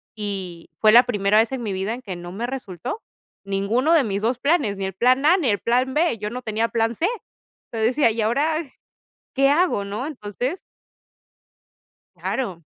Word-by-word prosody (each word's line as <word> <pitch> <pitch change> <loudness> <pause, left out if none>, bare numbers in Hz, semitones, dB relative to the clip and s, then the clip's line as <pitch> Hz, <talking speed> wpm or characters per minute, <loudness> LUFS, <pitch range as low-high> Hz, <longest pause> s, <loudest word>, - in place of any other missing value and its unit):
y 190 -5 -5
fue 215 - +6
la 240 +3 +8
primera 205 -3 +2
vez 225 +2 +2
en 255 - -3
mi 210 - -2
vida 190 +4 -2
en 250 - -7
que 195 -7 -6
no 175 0 -8
me 225 +5 -3
resultó 250 - -5 0.4
ninguno 210 +10 +1
de 310 -5 +5
mis 200 -2 -2
2 240 +2 0
planes, 280 - +1
ni 195 - -4
el 190 - -4
plan 255 +6 +3
A 350 +5 +6
ni 285 -10 0
el 205 - +1
plan 255 +3 +1
B, 320 -6 +2
yo 210 0 -4
no 250 +3 -6
tenía 225 -1 -1
plan 230 0 0
C. 340 - +1 0.7
Entonces 225 +2 +1
decía: 280 -6 +4
"¿Y 220 0 -2
ahora 285 +9 +1 0.8
qué 275 0 +4
hago, 325 - +2
no?". 210 +7 -4
Entonces 255 - -4 1.6
Claro. 190 -11 -3
230 Hz, 190 wpm, -23 LUFS, 205-265 Hz, 1.6 s, la